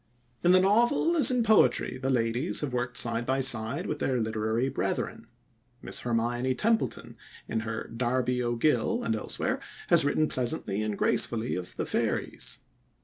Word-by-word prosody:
In 175 - +5
the 185 - +6
novel 240 - +2
as 290 -6 +6
in 250 -2 +1
poetry 210 - +3
the 130 +1 -2
ladies 120 +4 0
have 145 -4 -3
worked 125 0 -2
side 115 0 +2
by 130 +2 -1
side 125 -1 0
with 150 - -4
their 130 -2 0
literary 110 +2 -1
brethren. 135 - -3 0.6
Miss - - 0
Hermione 120 +2 -1
Templeton, 210 - -1 0.3
in 115 - -2
her 110 0 -4
Darby 125 +1 0
O'Gill, 120 +1 0
and 110 - 0
elsewhere, 110 - -2 0.3
has - - +7
written 150 +2 +1
pleasantly 125 -6 -1
and 105 -1 -3
gracefully 115 0 0
of 90 -1 -6
the - - -3
fairies. - - -2
125 Hz, 155 wpm, -28 LUFS, 115-150 Hz, 0.6 s, has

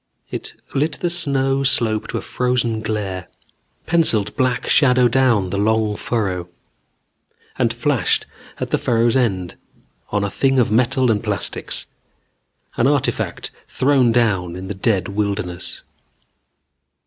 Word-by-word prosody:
It - - -5 0.2
lit 150 +3 +1
the 175 +4 -1
snow 135 -5 +1
slope 115 -5 +1
to - - -3
a - - -3
frozen 125 -3 -1
glare, 100 -5 -3 0.6
penciled 120 -12 +2
black 130 -3 0
shadow 125 -3 +5
down 120 -7 +2
the 100 - -1
long 110 0 +1
furrow, 95 -7 -2 1.1
and 120 -3 +2
flashed 120 +2 +1 0.3
at - - -4
the - - +2
furrow's 115 0 +2
end 95 -9 0 0.5
on 105 - 0
a 100 - -1
thing 135 +4 +1
of 120 -4 +3
metal 125 +2 +3
and 105 -1 0
plastics, 105 -3 -3 0.9
an 120 - +3
artifact 145 -2 -1 0.2
thrown 130 -3 +3
down 100 -7 +1
in 95 +1 -7
the - - -2
dead 95 -1 0
wilderness. 100 -3 -3
115 Hz, 130 wpm, -20 LUFS, 100-130 Hz, 1.1 s, shadow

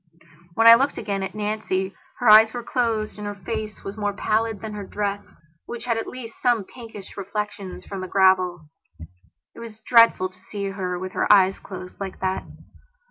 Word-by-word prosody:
When 225 - +3
I 230 - +12
looked 270 +5 +3
again 200 -3 -3
at 190 +1 -5
Nancy 205 -3 -2 0.2
her 245 - -1
eyes 220 +1 +8
were 240 - -4
closed 225 -4 -1
and 205 - -5
her 205 - -5
face 215 +2 -6
was 195 +2 -7
more 205 -1 -1
pallid 220 +1 0
than 220 0 -7
her 205 -1 -5
dress, 205 0 -3 0.5
which 240 0 -6
had 235 -2 +1
at 225 - -3
least 235 -3 -9
some 240 -4 +2
pinkish 225 -3 -11
reflections 200 -1 -5
from 195 -2 -6
the 185 - -5
gravel. 185 -3 +2 0.9
It - - -13
was 225 -2 -10
dreadful 230 -6 +5
to 185 0 -19
see 200 +1 -5
her 185 -2 -3
with 185 +1 -5
her - - +1
eyes 195 -2 +5
closed 185 -2 -10
like 195 -2 -6
that. 190 0 -1
205 Hz, 190 wpm, -23 LUFS, 190-225 Hz, 0.9 s, I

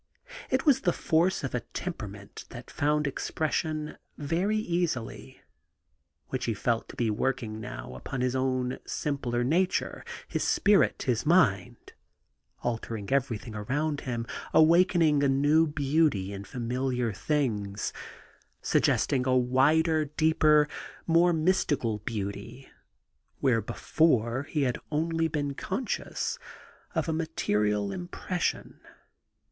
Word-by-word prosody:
It - - 0
was 270 -4 +5
the 175 - +2
force 175 +3 +1
of 135 - -3
a 125 - +1
temperament 105 - -7
that - - -10
found 150 +1 +1
expression 155 +2 -2 0.2
very 170 +9 0
easily, 170 - -3 0.9
which - - -2
he 115 - -1
felt 115 +2 -1
to - - -10
be 115 -3 0
working 110 -1 -2
now - - -7
upon 125 - -5
his 125 0 0
own 130 -1 -1
simpler 125 -5 -2
nature, 175 +8 0 0.2
his - - -2
spirit, 200 -1 +3
his 120 -4 0
mind, 150 - +2 0.3
— - - -39
altering 115 -3 -3
everything 120 -4 -1
around 140 +8 -2
him, 120 -2 -3 0.3
awakening 165 -2 +5
a 140 - +3
new 145 +4 +4
beauty 145 -9 +1
in 100 0 -7
familiar 125 -1 -2
things, 105 -2 -1 0.7
suggesting 130 -2 +1
a 130 0 +4
wider, 150 +6 +3
deeper, 150 0 +3 0.4
more 170 +1 +4
mystical 155 - +1
beauty 105 +4 -5 0.7
where 125 -5 +2
before 125 +1 +1
he 150 -3 0
had 125 -2 0
only 165 +1 0
been 145 -3 -2
conscious 200 - -3 0.6
of - - 0
a 160 - 0
material 105 -11 0
impression. 175 - -3
140 Hz, 120 wpm, -28 LUFS, 115-160 Hz, 0.9 s, was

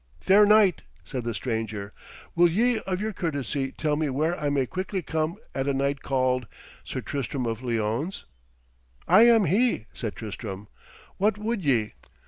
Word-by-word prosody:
'Fair 205 +2 +5
knight,' 210 -4 +5 0.2
said 125 +6 -4
the 120 - -2
stranger, 110 -3 -3 0.4
'will 175 0 +5
ye 230 +7 +2
of 185 -1 -1
your 215 +1 -2
courtesy 140 -5 -2
tell 150 +1 -1
me 155 -1 0
where 155 +6 0
I 150 -4 -2
may 140 -2 +1
quickly 185 - -4
come 160 +2 -2 0.2
at 135 0 -2
a 140 - +1
knight 140 +1 0
called 130 -2 0 0.4
Sir - - -5
Tristram 135 -2 -3
of 115 0 -3
Lyones?' 120 - -2 0.8
'I 185 +5 +7
am 225 -4 +5
he,' 200 - +2
said 110 -3 -4
Tristram. 105 -2 -7 0.5
'What 210 +1 +2
would 215 -1 -2
ye?' 120 -7 +1
145 Hz, 160 wpm, -26 LUFS, 125-190 Hz, 0.8 s, I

